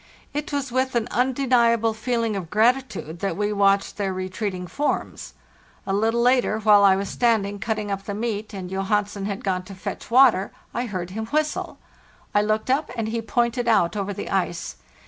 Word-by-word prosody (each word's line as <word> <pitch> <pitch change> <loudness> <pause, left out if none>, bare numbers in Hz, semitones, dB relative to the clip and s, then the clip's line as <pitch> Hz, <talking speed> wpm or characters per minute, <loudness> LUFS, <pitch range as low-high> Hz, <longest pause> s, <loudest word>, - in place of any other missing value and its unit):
It 295 +1 -3
was 280 -3 -2
with 260 +1 0
an 235 -1 +1
undeniable 240 -3 +2
feeling 230 -1 -1
of 180 -5 -5
gratitude 220 - +1
that 195 - -2
we 210 0 0
watched 200 -1 +2
their 200 -2 -1
retreating 185 0 -4
forms. 285 - -3 0.5
<A 195 - -1
little 225 +3 +2
later, 250 -3 +3
while 210 -1 +6
I 195 -1 +6
was 195 +1 -2
standing 205 -4 +1
cutting 215 0 -2
up 195 0 -3
the 205 - -4
meat 215 -1 -3
and 190 -3 -6
Johansen 200 +1 -1
had 200 -1 -4
gone 185 -2 0
to 195 - -10
fetch 185 - -6
water, 235 -6 +5 0.2
I 245 +1 -2
heard 185 -4 -4
him 220 +3 -4
whistle. 305 +3 -1 0.5
1 205 0 +2
looked 215 +3 0
up, 290 +3 +1
and 220 -1 -1
he 230 +1 -2
pointed 235 +1 0
out 215 -5 +3
over 200 -1 -2
the 195 - -6
ice. 175 -3 -2
215 Hz, 185 wpm, -23 LUFS, 195-235 Hz, 0.5 s, while